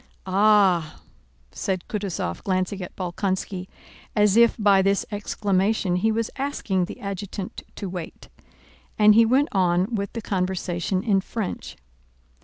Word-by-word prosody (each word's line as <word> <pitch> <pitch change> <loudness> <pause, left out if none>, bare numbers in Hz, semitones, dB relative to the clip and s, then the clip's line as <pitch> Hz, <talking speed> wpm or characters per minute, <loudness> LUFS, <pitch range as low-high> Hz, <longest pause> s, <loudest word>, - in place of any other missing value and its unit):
"Ah!..." 190 -4 +3 0.5
said 185 -2 -2
Kutúzov 190 - -3
glancing 185 +1 -1
at 180 - -8
Bolkónski 185 0 -3 0.5
as 210 -1 +4
if 235 0 +5
by 200 -3 +4
this 195 +1 +1
exclamation 200 -2 0
he 220 +5 +2
was 225 0 -1
asking 210 -10 -1
the - - -9
adjutant 200 -1 -6
to 200 - -5
wait, 180 -3 -7 0.7
and 210 0 +7
he 225 +1 +6
went 270 +5 +3
on 185 +2 +1
with 200 -2 -2
the 230 - -4
conversation 185 -1 -1
in 200 -4 +2
French. 210 0 -5
195 Hz, 130 wpm, -24 LUFS, 185-210 Hz, 0.7 s, and